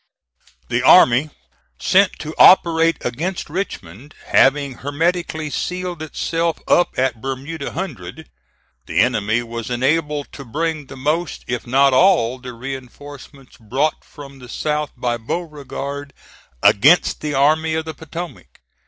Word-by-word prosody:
The -, -, 0 dB
army 130 Hz, +6 st, +6 dB, 0.5 s
sent 190 Hz, 0 st, +3 dB
to 155 Hz, 0 st, -6 dB
operate 165 Hz, -3 st, +6 dB
against 155 Hz, +7 st, -3 dB
Richmond 145 Hz, -, -6 dB
having 135 Hz, -2 st, +3 dB
hermetically 160 Hz, +1 st, -2 dB
sealed 180 Hz, -1 st, -4 dB
itself 165 Hz, +1 st, -2 dB
up 175 Hz, -, +2 dB
at 125 Hz, -3 st, 0 dB
Bermuda 135 Hz, +3 st, -5 dB
Hundred, 135 Hz, -, -6 dB, 0.6 s
the 80 Hz, -, 0 dB
enemy 115 Hz, 0 st, +1 dB
was 115 Hz, 0 st, -6 dB
enabled 145 Hz, +4 st, -1 dB
to 140 Hz, -, -9 dB
bring 155 Hz, +3 st, -3 dB
the 135 Hz, -, -11 dB
most, 155 Hz, +5 st, -2 dB
if 120 Hz, 0 st, -4 dB
not 135 Hz, +2 st, +4 dB
all, 130 Hz, -6 st, +3 dB
the 125 Hz, -1 st, -8 dB
reinforcements 135 Hz, +2 st, -10 dB
brought 130 Hz, +8 st, -1 dB
from 140 Hz, -2 st, -13 dB
the 125 Hz, -1 st, -12 dB
south 150 Hz, +2 st, -2 dB
by 120 Hz, -1 st, -1 dB
Beauregard 140 Hz, 0 st, -6 dB, 0.5 s
against 150 Hz, -, +4 dB
the 150 Hz, -2 st, -3 dB
Army 155 Hz, +3 st, +2 dB
of 160 Hz, 0 st, -2 dB
the 160 Hz, -, -5 dB
Potomac. 160 Hz, -, -9 dB
145 Hz, 125 wpm, -20 LUFS, 125-160 Hz, 0.6 s, army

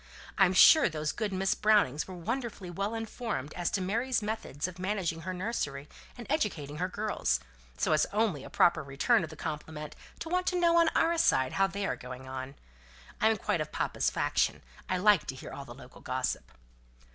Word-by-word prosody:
I'm 190 Hz, -2 st, +4 dB
sure 295 Hz, -, +8 dB
those 155 Hz, -2 st, -2 dB
good 215 Hz, -3 st, -3 dB
Miss 190 Hz, 0 st, +1 dB
Brownings 205 Hz, -10 st, +2 dB
were 185 Hz, -, -8 dB
wonderfully 210 Hz, 0 st, -4 dB
well 200 Hz, +5 st, -2 dB
informed 225 Hz, -, -4 dB
as 175 Hz, -1 st, -1 dB
to 195 Hz, -, -1 dB
Mary's 230 Hz, +5 st, 0 dB
methods 210 Hz, -8 st, -3 dB
of 180 Hz, 0 st, -10 dB
managing 185 Hz, -4 st, -2 dB
her 185 Hz, -, -4 dB
nursery, 180 Hz, -8 st, -3 dB, 0.3 s
and 240 Hz, -, -8 dB
educating 175 Hz, -, -1 dB
her 180 Hz, +3 st, 0 dB
girls; 210 Hz, +3 st, -1 dB, 0.4 s
so -, -, +1 dB
it's 155 Hz, -, +3 dB
only 205 Hz, -10 st, 0 dB
a -, -, -9 dB
proper 170 Hz, -, +3 dB
return 155 Hz, -, +2 dB
of 160 Hz, -, -5 dB
the 155 Hz, -, -10 dB
compliment 150 Hz, 0 st, -6 dB, 0.2 s
to -, -, -6 dB
want 360 Hz, +2 st, 0 dB
to 360 Hz, -, +1 dB
know 340 Hz, -1 st, +4 dB
on 335 Hz, -1 st, +5 dB
our 335 Hz, 0 st, +3 dB
side 130 Hz, -, +3 dB
how 195 Hz, 0 st, +3 dB
they 200 Hz, +1 st, -3 dB
are -, -, -1 dB
going 130 Hz, +1 st, -9 dB
on. 130 Hz, +1 st, -6 dB, 0.7 s
I'm 220 Hz, 0 st, +4 dB
quite 170 Hz, -, -1 dB
of 155 Hz, -, -4 dB
papa's -, -, 0 dB
faction. -, -, 0 dB, 0.3 s
I 185 Hz, -, +1 dB
like 200 Hz, -2 st, +4 dB
to 135 Hz, -, -4 dB
hear 130 Hz, -, -9 dB
all 140 Hz, -, -7 dB
the 120 Hz, -2 st, -10 dB
local 130 Hz, -1 st, -14 dB
gossip." 130 Hz, 0 st, -3 dB
185 Hz, 195 wpm, -30 LUFS, 150-220 Hz, 0.7 s, sure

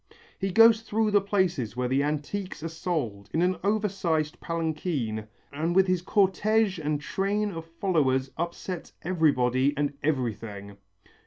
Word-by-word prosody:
He 195 Hz, -, -1 dB
goes 225 Hz, +3 st, +6 dB
through 220 Hz, -1 st, 0 dB
the 205 Hz, -1 st, +5 dB
places 180 Hz, -, 0 dB
where 125 Hz, 0 st, 0 dB
the 135 Hz, +2 st, +2 dB
antiques 155 Hz, +5 st, -3 dB
are -, -, -1 dB
sold 150 Hz, -, -3 dB
in 165 Hz, -, +3 dB
an 185 Hz, +1 st, +1 dB
over 210 Hz, +1 st, +2 dB
sized 160 Hz, -6 st, -1 dB
palanquin 155 Hz, -, -2 dB, 0.3 s
and 160 Hz, +4 st, -1 dB
with 190 Hz, 0 st, +6 dB
his 185 Hz, -2 st, +1 dB
cortège 195 Hz, 0 st, +2 dB
and 150 Hz, 0 st, 0 dB
train 200 Hz, +6 st, -1 dB
of 165 Hz, -2 st, -6 dB
followers 135 Hz, -8 st, +1 dB
upsets 170 Hz, +1 st, -5 dB
everybody 140 Hz, -6 st, +2 dB
and 145 Hz, -1 st, 0 dB
everything. 110 Hz, -8 st, -3 dB
165 Hz, 145 wpm, -27 LUFS, 140-190 Hz, 0.3 s, goes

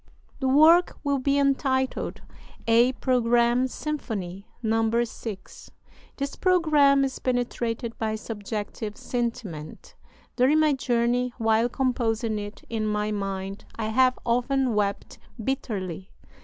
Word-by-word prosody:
The 265 Hz, -, 0 dB
work 315 Hz, +6 st, +5 dB
will 280 Hz, -1 st, +1 dB
be 275 Hz, +2 st, +1 dB
entitled 270 Hz, -2 st, 0 dB, 0.4 s
'A 235 Hz, +3 st, +4 dB
Programme 240 Hz, 0 st, +2 dB
Symphony' 215 Hz, -, -5 dB, 0.2 s
(No. 225 Hz, +1 st, +2 dB
6). 220 Hz, -3 st, -8 dB, 0.5 s
This 280 Hz, 0 st, -3 dB
programme 300 Hz, -6 st, +4 dB
is 265 Hz, -, -4 dB
penetrated 240 Hz, -2 st, -2 dB
by 220 Hz, -1 st, -1 dB
subjective 215 Hz, 0 st, -5 dB
sentiment. 225 Hz, -11 st, -5 dB, 0.4 s
During 270 Hz, +5 st, +4 dB
my 310 Hz, -2 st, +4 dB
journey, 245 Hz, -1 st, 0 dB
while 225 Hz, 0 st, +2 dB
composing 230 Hz, -4 st, 0 dB
it 205 Hz, 0 st, -8 dB
in 220 Hz, -2 st, -2 dB
my 210 Hz, 0 st, -1 dB
mind, 195 Hz, -1 st, -4 dB
I 220 Hz, -1 st, -3 dB
have 255 Hz, +3 st, +3 dB
often 250 Hz, +1 st, +1 dB
wept 200 Hz, -1 st, -2 dB, 0.2 s
bitterly. 200 Hz, -, -4 dB
235 Hz, 115 wpm, -26 LUFS, 215-265 Hz, 0.5 s, work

